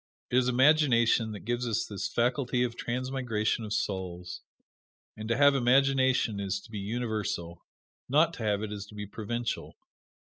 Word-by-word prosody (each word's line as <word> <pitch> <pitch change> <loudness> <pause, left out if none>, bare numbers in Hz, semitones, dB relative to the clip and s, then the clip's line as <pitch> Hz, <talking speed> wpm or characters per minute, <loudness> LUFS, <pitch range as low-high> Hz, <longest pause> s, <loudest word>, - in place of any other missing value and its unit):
It 125 - +3
is 125 - 0
imagination 125 -4 +4
that 105 - -8
gives 120 +1 -1
us 115 0 0
this 100 -2 -4
faculty 125 +1 +1
of 120 -1 -2
transmigration 120 -3 -2
of 105 - -7
souls; 90 -4 -3 0.7
and 110 +1 -7
to 115 - +1
have 145 0 +6
imagination 130 -3 +3
is 100 0 -2
to 115 - -16
be 105 - -4
universal; 105 -6 -3 0.5
not 155 +5 +4
to 120 - -7
have 105 -1 0
it 105 - -4
is 100 -1 -7
to 105 - -14
be 105 0 -5
provincial. 115 +3 -4
115 Hz, 165 wpm, -29 LUFS, 105-125 Hz, 0.7 s, have